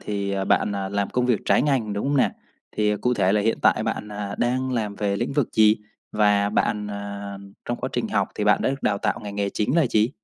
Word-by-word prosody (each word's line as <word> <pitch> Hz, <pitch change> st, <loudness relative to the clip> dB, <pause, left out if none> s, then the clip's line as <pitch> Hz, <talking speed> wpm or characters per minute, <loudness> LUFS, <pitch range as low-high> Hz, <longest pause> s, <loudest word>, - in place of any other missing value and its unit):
thì, 100 Hz, -1 st, -3 dB
à, 95 Hz, 0 st, -1 dB
bạn, 105 Hz, -, +2 dB
à, 95 Hz, -1 st, -3 dB
làm 100 Hz, 0 st, -1 dB
công 125 Hz, 0 st, 0 dB
việc 120 Hz, -5 st, +2 dB
trái -, -, +3 dB
ngành, 130 Hz, -8 st, 0 dB
đúng 100 Hz, +6 st, -2 dB
không 145 Hz, -, +1 dB
nè? 130 Hz, -, +3 dB, 0.5 s
Thì 105 Hz, -1 st, +2 dB
cụ 125 Hz, +4 st, 0 dB
thể 95 Hz, -3 st, +2 dB
là 105 Hz, -, +3 dB
hiện 115 Hz, +2 st, +1 dB
tại -, -, +4 dB
bạn, 105 Hz, -, -3 dB
à, 105 Hz, -1 st, -5 dB
đang 130 Hz, +2 st, 0 dB
làm 110 Hz, -4 st, -2 dB
về 100 Hz, -1 st, 0 dB
lĩnh 120 Hz, +6 st, -2 dB
vực 140 Hz, -4 st, +1 dB
gì? 110 Hz, 0 st, +5 dB, 0.4 s
Và 105 Hz, -1 st, +3 dB
bạn, 105 Hz, 0 st, 0 dB
à, 100 Hz, -1 st, -6 dB, 0.3 s
trong 120 Hz, -, -2 dB
quá -, -, -2 dB
trình -, -, -1 dB
học -, -, 0 dB
thì -, -, -2 dB
bạn -, -, +3 dB
đã -, -, +2 dB
được 135 Hz, -, -5 dB
đào 100 Hz, -1 st, +1 dB
tạo 105 Hz, -, -1 dB
ngành 100 Hz, -1 st, -7 dB
nghề 100 Hz, -1 st, 0 dB
chính 110 Hz, +11 st, 0 dB
là 160 Hz, -, +4 dB
gì? 110 Hz, 0 st, +2 dB
105 Hz, 260 wpm, -24 LUFS, 100-120 Hz, 0.5 s, gì